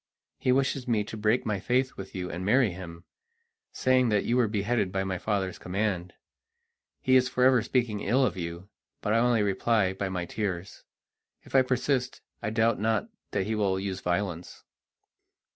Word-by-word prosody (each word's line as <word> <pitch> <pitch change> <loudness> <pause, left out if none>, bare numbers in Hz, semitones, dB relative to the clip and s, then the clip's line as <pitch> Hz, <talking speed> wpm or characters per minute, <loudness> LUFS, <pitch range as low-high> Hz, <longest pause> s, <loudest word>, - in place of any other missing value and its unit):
He 130 - +2
wishes 135 0 +1
me 110 -3 +2
to 110 - -8
break 110 +3 +1
my 105 -3 -1
faith 130 +5 0
with 95 0 -9
you 90 -1 -4
and 90 +2 -5
marry 115 +2 +3
him, 85 -2 -9 0.7
saying 130 -1 +2
that 105 -2 +1
you 120 - +1
were 125 -2 +3
beheaded 105 -1 0
by 95 0 -1
my 95 -2 -3
father's 95 -3 -2
command. 90 -2 -2 0.9
He 130 - +3
is 130 0 +4
forever 125 -1 +4
speaking 115 -2 0
ill 130 +5 +2
of - - -1
you, 85 +1 -6 0.3
but 105 - 0
I 115 - +4
only 120 -2 +3
reply 100 0 +1
by 95 0 -3
my 90 -2 -3
tears. 95 -2 -4 0.6
If - - -16
I 135 - +7
persist, 130 0 0 0.2
I 105 - -2
doubt 110 +1 +2
not 110 - 0 0.2
that 95 -2 -1
he 110 - -1
will 100 -3 +1
use 95 -1 -3
violence." 90 -1 -3
105 Hz, 175 wpm, -28 LUFS, 95-125 Hz, 0.9 s, I